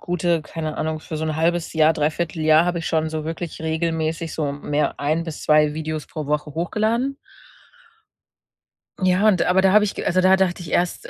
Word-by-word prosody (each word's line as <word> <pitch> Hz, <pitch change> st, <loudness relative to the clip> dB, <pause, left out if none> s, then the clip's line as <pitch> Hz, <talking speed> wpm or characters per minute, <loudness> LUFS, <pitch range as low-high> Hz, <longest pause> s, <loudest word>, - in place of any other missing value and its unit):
gute 175 Hz, -2 st, 0 dB
keine 155 Hz, 0 st, -5 dB
Ahnung, 155 Hz, 0 st, -2 dB
für 155 Hz, -, -6 dB
so 155 Hz, -, -3 dB
'n 155 Hz, -1 st, -2 dB
1/2 165 Hz, +1 st, 0 dB
Jahr, 160 Hz, 0 st, +4 dB
3/4 155 Hz, +2 st, -2 dB
Jahr 155 Hz, +1 st, +5 dB
habe 175 Hz, -1 st, -1 dB
ich 160 Hz, -, -6 dB
schon 160 Hz, -1 st, 0 dB
so 155 Hz, -1 st, -4 dB
wirklich 165 Hz, +1 st, -5 dB
regelmäßig 160 Hz, 0 st, -2 dB
so 145 Hz, -3 st, -2 dB
mehr 145 Hz, +1 st, -2 dB
ein 155 Hz, +3 st, 0 dB
bis 160 Hz, -2 st, -7 dB
2 150 Hz, -1 st, +4 dB
Videos 155 Hz, 0 st, -4 dB
pro 155 Hz, -2 st, -6 dB
Woche 150 Hz, 0 st, -2 dB
hochgeladen. 220 Hz, +10 st, -1 dB, 1.8 s
Ja, 185 Hz, +3 st, +3 dB
und 190 Hz, -5 st, +3 dB
aber 185 Hz, +1 st, +3 dB
da 190 Hz, 0 st, +4 dB
habe 210 Hz, 0 st, +6 dB
ich 205 Hz, -, -2 dB
g -, -, -5 dB
also, 185 Hz, +1 st, +2 dB
da 185 Hz, +1 st, +5 dB
dachte 190 Hz, -2 st, 0 dB
ich 170 Hz, -, -8 dB
erst 175 Hz, 0 st, -1 dB
160 Hz, 200 wpm, -22 LUFS, 155-180 Hz, 1.8 s, habe